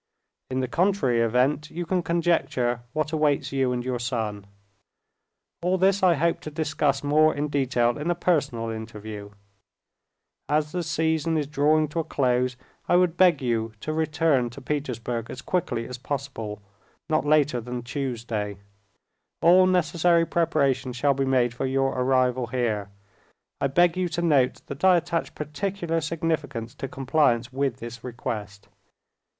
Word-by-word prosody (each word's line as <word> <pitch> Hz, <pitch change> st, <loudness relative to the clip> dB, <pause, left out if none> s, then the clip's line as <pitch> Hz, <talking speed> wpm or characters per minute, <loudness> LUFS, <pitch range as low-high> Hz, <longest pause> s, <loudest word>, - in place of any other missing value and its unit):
In 130 Hz, 0 st, -1 dB
the 130 Hz, -, -1 dB
contrary 165 Hz, -7 st, +2 dB
event, 130 Hz, +6 st, +1 dB
you 175 Hz, +2 st, -5 dB
can 185 Hz, +1 st, 0 dB
conjecture 165 Hz, -8 st, 0 dB
what 155 Hz, +2 st, -2 dB
awaits 150 Hz, -3 st, +1 dB
you 135 Hz, -2 st, +1 dB
and 125 Hz, 0 st, -2 dB
your 125 Hz, -1 st, -2 dB
son. 110 Hz, -4 st, -3 dB, 1.1 s
All 180 Hz, +2 st, +1 dB
this 195 Hz, +1 st, +3 dB
I 180 Hz, -3 st, +5 dB
hope 165 Hz, +3 st, +1 dB
to -, -, -7 dB
discuss 150 Hz, -3 st, 0 dB
more 155 Hz, +2 st, +4 dB
in 145 Hz, +1 st, -2 dB
detail 125 Hz, -3 st, +1 dB
in 155 Hz, +3 st, -2 dB
a 175 Hz, -, +2 dB
personal 140 Hz, -10 st, 0 dB
interview. 110 Hz, -2 st, -7 dB, 1.2 s
As 150 Hz, 0 st, +1 dB
the 180 Hz, -, -2 dB
season 160 Hz, -1 st, 0 dB
is 150 Hz, -, 0 dB
drawing 150 Hz, +2 st, +2 dB
to 165 Hz, -, -3 dB
a -, -, +1 dB
close, 125 Hz, -3 st, 0 dB, 0.3 s
I -, -, +5 dB
would 180 Hz, -2 st, +3 dB
beg 180 Hz, -6 st, +4 dB
you 115 Hz, -2 st, -1 dB
to 155 Hz, -, -3 dB
return 155 Hz, -5 st, +1 dB
to 120 Hz, -, -10 dB
Petersburg 125 Hz, -5 st, -3 dB
as 130 Hz, -, -8 dB
quickly 165 Hz, -10 st, -1 dB
as 125 Hz, 0 st, -7 dB
possible, 125 Hz, -7 st, -5 dB, 0.4 s
not 155 Hz, -1 st, +1 dB
later 145 Hz, -4 st, +2 dB
than 125 Hz, +1 st, -5 dB
Tuesday. 115 Hz, -6 st, -3 dB, 0.8 s
All 185 Hz, +2 st, +6 dB
necessary 170 Hz, -1 st, +3 dB
preparations 140 Hz, -7 st, 0 dB
shall 140 Hz, +3 st, +2 dB
be 135 Hz, 0 st, -1 dB
made 125 Hz, -3 st, +2 dB
for 130 Hz, +2 st, -2 dB
your 135 Hz, 0 st, +1 dB
arrival 130 Hz, -1 st, +1 dB
here. 115 Hz, -5 st, -1 dB, 0.7 s
I 140 Hz, -, +3 dB
beg 175 Hz, +5 st, +3 dB
you 180 Hz, -1 st, 0 dB
to 170 Hz, -, 0 dB
note 140 Hz, -6 st, +2 dB
that 140 Hz, +4 st, -8 dB
I 185 Hz, -1 st, +6 dB
attach 170 Hz, 0 st, -2 dB
particular 165 Hz, +2 st, -2 dB
significance 150 Hz, -7 st, -2 dB
to 135 Hz, -, -5 dB
compliance 130 Hz, -3 st, +1 dB
with 135 Hz, -2 st, -1 dB
this 115 Hz, -1 st, -8 dB
request. 105 Hz, -5 st, -6 dB
140 Hz, 155 wpm, -25 LUFS, 120-160 Hz, 1.2 s, All